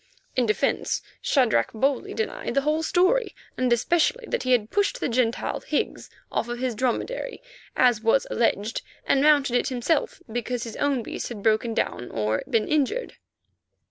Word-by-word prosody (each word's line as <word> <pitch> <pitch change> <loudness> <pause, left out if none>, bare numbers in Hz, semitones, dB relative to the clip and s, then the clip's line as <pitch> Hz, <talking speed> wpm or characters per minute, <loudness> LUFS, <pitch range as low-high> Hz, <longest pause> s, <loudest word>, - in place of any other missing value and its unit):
In 250 -2 +2
defence 215 - 0 0.2
Shadrach 245 - +2
boldly 275 - 0
denied 450 0 -3
the 275 - +4
whole 305 +3 +1
story, 370 +9 +2 0.2
and 255 -1 0
especially 340 - +2
that - - -1
he 255 - -1
had 225 -3 +2
pushed 410 +5 +1
the - - 0
Gentile, 235 -2 0
Higgs, - - -2 0.2
off - - -1
his 240 +1 -2
dromedary, 260 - -2 0.4
as 245 -4 +4
was 225 +4 +3
alleged, 225 -1 0 0.2
and 270 - +3
mounted 285 -4 +4
it 245 - +2
himself 260 +4 0
because 240 +1 -2
his 230 -2 -7
own 280 -4 +1
beast - - -5
had 215 -4 -7
broken 225 +1 +2
down 120 - -2
or 110 0 -1
been 220 -2 +1
injured. 310 - 0
255 Hz, 160 wpm, -25 LUFS, 230-305 Hz, 0.4 s, the